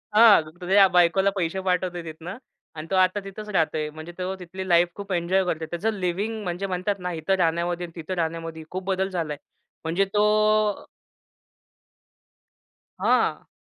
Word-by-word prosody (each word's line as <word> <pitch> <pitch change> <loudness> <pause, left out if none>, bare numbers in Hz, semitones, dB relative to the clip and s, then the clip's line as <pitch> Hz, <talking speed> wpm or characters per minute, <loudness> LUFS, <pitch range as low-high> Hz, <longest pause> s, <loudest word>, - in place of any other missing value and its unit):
हां, 220 -5 +8 0.2
त्याच्या 195 +2 +5
बायकोला 180 +2 +4
पैसे 185 0 -1
पाठवतोय 180 -2 -1
तिथनं. 165 +5 -8 0.4
आणि 155 +1 -7
तो - - +2
आता 185 +2 +3
तिथंच 210 +2 -8
राहतोय. 155 -4 0
म्हणजे 155 +3 -9
तो 185 +1 -3
तिथली 185 +2 -7
लाईफ 170 0 +5
खूप 200 -1 -8
एन्जॉय 180 +2 +1
करतो. 160 -2 -2
त्याचं 210 +6 -1
लिव्हिंग 200 +4 -2
म्हणजे 180 +2 -3
म्हणतात 185 +2 -1
ना, 180 0 -3
इथं 160 +4 -1
राहण्यामध्ये 175 +1 0
आणि 165 - -13
तिथं 175 +4 -5
राहण्यामध्ये 165 -1 -3
खूप 185 +1 -4
बदल 190 0 0
झालाय. 160 -5 -3 0.5
म्हणजे 170 +5 +1
तो 215 0 +2 2.1
हां. - - +1
180 Hz, 150 wpm, -25 LUFS, 170-195 Hz, 2.1 s, हां